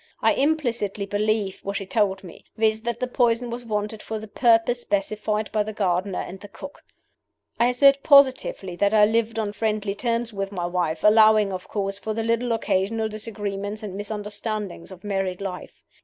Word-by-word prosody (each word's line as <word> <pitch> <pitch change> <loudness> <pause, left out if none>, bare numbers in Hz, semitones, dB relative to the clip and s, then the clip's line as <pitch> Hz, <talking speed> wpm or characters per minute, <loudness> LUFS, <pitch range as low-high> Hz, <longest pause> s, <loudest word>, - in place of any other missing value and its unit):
I - - +3
implicitly 240 -9 0
believed 205 -1 -1
what 200 0 -3
she 195 - -5
told 195 -1 0
me; 175 - -12
viz., 220 0 +2
that 235 0 -3
the 255 - 0
poison 240 -1 +1
was 240 +1 -5
wanted 210 0 -3
for 220 - -5
the 215 0 -8
purposes 235 +2 +3
specified 210 +1 -1
by 215 - +1
the 215 +1 -3
gardener 190 -2 0
and 190 - -8
the 205 - -10
cook. 280 - -11 0.8
"I 235 - +5
assert 275 +3 +5
positively 260 - +4
that 200 +3 +2
I 210 -1 +7
lived 225 +1 0
on 210 -2 -2
friendly 210 -2 -1
terms 235 +1 -2
with 195 0 -3
my 180 -3 -3
wife, 175 -3 -2
allowing, 215 -1 +5
of 185 0 -6
course, 195 -1 -3
for 215 +1 -4
the 225 - -1
little 230 +2 0
occasional 220 0 0
disagreements 210 -1 -5
and 205 -3 -5
misunderstandings 205 -2 -5
of 185 0 -12
married 195 -3 -2
life. 195 -2 -7
210 Hz, 180 wpm, -24 LUFS, 195-230 Hz, 0.8 s, I